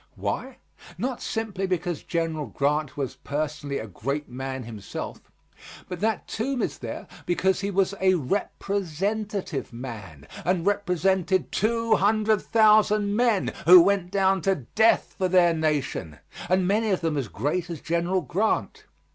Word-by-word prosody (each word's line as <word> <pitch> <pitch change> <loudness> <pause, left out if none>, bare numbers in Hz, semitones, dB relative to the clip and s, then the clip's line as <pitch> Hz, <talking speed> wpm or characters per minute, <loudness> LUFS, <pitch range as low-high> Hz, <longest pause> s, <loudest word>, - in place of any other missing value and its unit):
Why, - - -4 0.4
not 255 -1 -3
simply 205 -4 -3
because 175 -3 -2
General 165 -3 -2
Grant 145 +1 -1
was 135 -3 -3
personally 145 -1 -3
a - - -4
great 140 - -4
man 130 +1 -5
himself, 110 -4 -7 0.7
but 180 -2 -6
that 220 +2 -1
tomb 250 +3 -2
is - - -3
there - - -6 0.2
because 185 +1 +1
he 200 - -1
was 195 0 +1
a 185 -1 +4
representative 195 +1 -2
man 105 - -8 0.2
and 180 -1 0
represented 190 -2 +1
two 230 +1 +2
hundred 215 +1 +2
thousand 215 -2 +4
men 230 -4 +2
who 180 +1 +11
went 190 0 +3
down 195 -1 +2
to 195 +3 +2 0.2
death 220 +1 +3
for 185 - +2
their 180 -2 +4
nation 140 - -1 0.3
and 185 0 +2
many 215 +3 +2
of 190 -3 +1
them 165 -2 0
as 135 -5 -1
great 170 - -2
as 165 -3 -5
General 170 +3 0
Grant. 190 - -1
180 Hz, 145 wpm, -25 LUFS, 150-205 Hz, 0.7 s, who